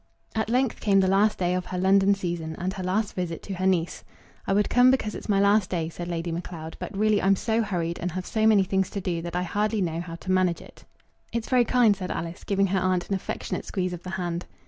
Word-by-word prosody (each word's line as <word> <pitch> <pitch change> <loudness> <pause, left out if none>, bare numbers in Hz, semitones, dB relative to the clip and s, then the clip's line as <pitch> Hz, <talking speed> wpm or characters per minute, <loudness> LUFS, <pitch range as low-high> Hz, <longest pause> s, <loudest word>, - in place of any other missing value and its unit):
At 220 -1 -1
length 250 0 +1
came 200 -2 +3
the 190 - +3
last 200 +3 +3
day 180 -1 0
of 180 0 -2
her 185 - -4
London 195 +2 +4
season, 170 -4 -4
and 185 +2 -2
her 195 - -6
last 195 +3 -1
visit 175 -3 -4
to 200 - -5
her 185 +1 -1
niece. 175 -3 0 0.4
"I - - +2
would 205 +1 +3
come 250 +1 +5
because 255 -5 +1
it's - - -8
my 200 -1 +3
last 200 -1 +3
day," 165 -3 -2
said 175 +1 -7
Lady 170 0 -3
Macleod; 165 -1 -6
"but 195 - -6
really 215 0 +3
I'm 195 +1 +4
so 225 +3 0
hurried, 175 -5 -2
and 180 -1 -3
have 185 0 -4
so 220 0 +1
many 210 -3 +5
things 190 0 0
to 200 - -4
do, 175 -3 -2
that 170 +1 -6
I 180 - 0
hardly 210 +4 0
know 170 -3 -1
how 170 -1 -7
to 185 +2 -5
manage 185 -2 +2
it." - - -15 0.5
"It's 230 -1 -3
very 250 -2 +4
kind," 235 -4 +4
said 185 -2 -6
Alice, 165 +1 -5
giving 195 -1 +1
her 190 0 +1
aunt 185 -1 0
an - - 0
affectionate 190 - -3
squeeze 185 -2 -2
of 175 - -6
the 185 - -8
hand. 175 -1 -3
185 Hz, 255 wpm, -26 LUFS, 175-205 Hz, 0.5 s, come